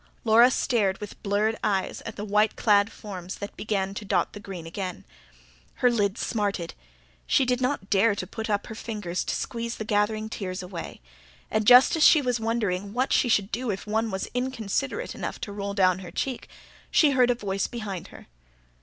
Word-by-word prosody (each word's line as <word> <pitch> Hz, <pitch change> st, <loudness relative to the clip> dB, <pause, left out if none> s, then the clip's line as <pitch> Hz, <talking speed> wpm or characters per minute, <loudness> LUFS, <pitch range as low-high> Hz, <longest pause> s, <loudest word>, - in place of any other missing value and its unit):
Laura 230 Hz, +2 st, +6 dB
stared, 215 Hz, -7 st, +1 dB
with 210 Hz, -1 st, -9 dB
blurred 210 Hz, +2 st, +1 dB
eyes, 195 Hz, -3 st, 0 dB
at -, -, -6 dB
the 210 Hz, -, -5 dB
white 210 Hz, +1 st, +2 dB
clad 205 Hz, 0 st, +3 dB
forms 185 Hz, -4 st, -7 dB
that 200 Hz, -, -7 dB
began 195 Hz, -3 st, -2 dB
to 200 Hz, -, -6 dB
dot 200 Hz, -, 0 dB
the 205 Hz, -, -8 dB
green 190 Hz, -5 st, -8 dB
again. 180 Hz, +2 st, -5 dB, 0.7 s
Her 250 Hz, -, +3 dB
lids 205 Hz, -2 st, 0 dB
smarted. 200 Hz, -6 st, -2 dB, 0.5 s
She 270 Hz, -, +3 dB
did 250 Hz, 0 st, 0 dB
not 255 Hz, -6 st, -1 dB
dare 205 Hz, +1 st, +4 dB
to -, -, -4 dB
put 220 Hz, 0 st, -6 dB
up 205 Hz, -1 st, 0 dB
her -, -, -7 dB
fingers 210 Hz, -6 st, -4 dB
to -, -, -1 dB
squeeze 235 Hz, 0 st, -3 dB
the 220 Hz, -, -5 dB
gathering 215 Hz, +1 st, 0 dB
tears 185 Hz, -4 st, -5 dB
away, 180 Hz, -2 st, -7 dB, 0.5 s
and 215 Hz, -1 st, 0 dB
just 250 Hz, +5 st, +8 dB
as 320 Hz, -, +2 dB
she 315 Hz, -, +8 dB
was 250 Hz, -4 st, 0 dB
wondering 205 Hz, -4 st, -1 dB
what 255 Hz, +3 st, +1 dB
she 245 Hz, -, +3 dB
should 205 Hz, -2 st, +2 dB
do 245 Hz, +1 st, -2 dB
if 195 Hz, -1 st, -3 dB
one 220 Hz, +1 st, 0 dB
was 190 Hz, -2 st, -3 dB
inconsiderate 260 Hz, -, -2 dB
enough -, -, -5 dB
to 205 Hz, -, -5 dB
roll 200 Hz, 0 st, -4 dB
down 185 Hz, -2 st, +3 dB
her 180 Hz, -2 st, -8 dB
cheek, 260 Hz, -3 st, -3 dB, 0.4 s
she 300 Hz, -3 st, +4 dB
heard 255 Hz, -2 st, +4 dB
a 245 Hz, -, +3 dB
voice 195 Hz, -3 st, -2 dB
behind 205 Hz, -7 st, -6 dB
her. -, -, -14 dB
210 Hz, 195 wpm, -26 LUFS, 195-235 Hz, 0.7 s, just